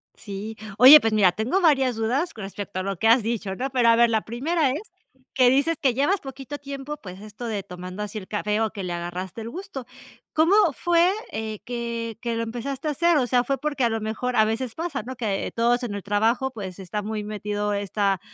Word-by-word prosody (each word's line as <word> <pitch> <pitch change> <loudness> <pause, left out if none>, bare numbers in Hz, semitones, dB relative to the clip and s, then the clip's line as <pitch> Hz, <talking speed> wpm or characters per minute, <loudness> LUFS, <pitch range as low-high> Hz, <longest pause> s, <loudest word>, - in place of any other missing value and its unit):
Sí, 210 +1 -7 0.2
oye, 270 +6 +11
pues, 225 -3 0
mira, 195 -4 +5
tengo 230 - 0
varias 270 -7 +3
dudas 250 +10 -1
con 215 - -8
respecto 195 -1 -5
a - - -2
lo 195 -1 -3
que 225 - +1
has 230 0 +5
dicho, 215 -4 -2
¿no?, 265 +5 -3
pero 245 -3 +3
a 230 - +6
ver, 235 0 +5
la 220 -1 +1
primera 280 +6 0
es, 295 - -3 0.5
que 255 -2 +5
dices 285 +5 +2
que 260 -4 +3
llevas 295 +10 +2
poquito 270 +1 -7
tiempo, 280 +1 -6
pues, 190 -7 -10
esto 215 +3 -9
de 210 -4 -3
tomando 185 +2 -7
así 210 +1 -6
el 185 - -7
café 210 0 -1
o 220 - +1
que 200 -3 -6
le 175 -1 -3
agarraste 175 +4 -5
el 225 - -6
gusto, 350 -5 -7 0.5
¿cómo 325 +5 +4 0.2
fue, 345 0 +3 0.2
eh, 220 -1 -4
que 235 -2 -4
que 235 -2 -2
lo 230 - -1
empezaste 250 +6 -4
a - - +1
hacer?, 335 +2 +3
o 255 - +2
sea, 245 0 +3
fue 275 +2 -1
porque 290 -2 -2
a - - +3
lo 225 -1 -2
mejor 235 +3 -2
a 215 - +5
veces 225 +2 -2
pasa, 325 -6 -3
¿no?, 260 +3 -7
que 210 -5 -2
todos 240 +2 +2
en 205 -4 -3
el 200 - -6
trabajo, 225 +6 +1
pues, 195 -6 -7
está 190 +3 -4
muy 210 0 -4
metido 210 0 -3
esta 200 -1 0
230 Hz, 230 wpm, -24 LUFS, 210-265 Hz, 0.5 s, oye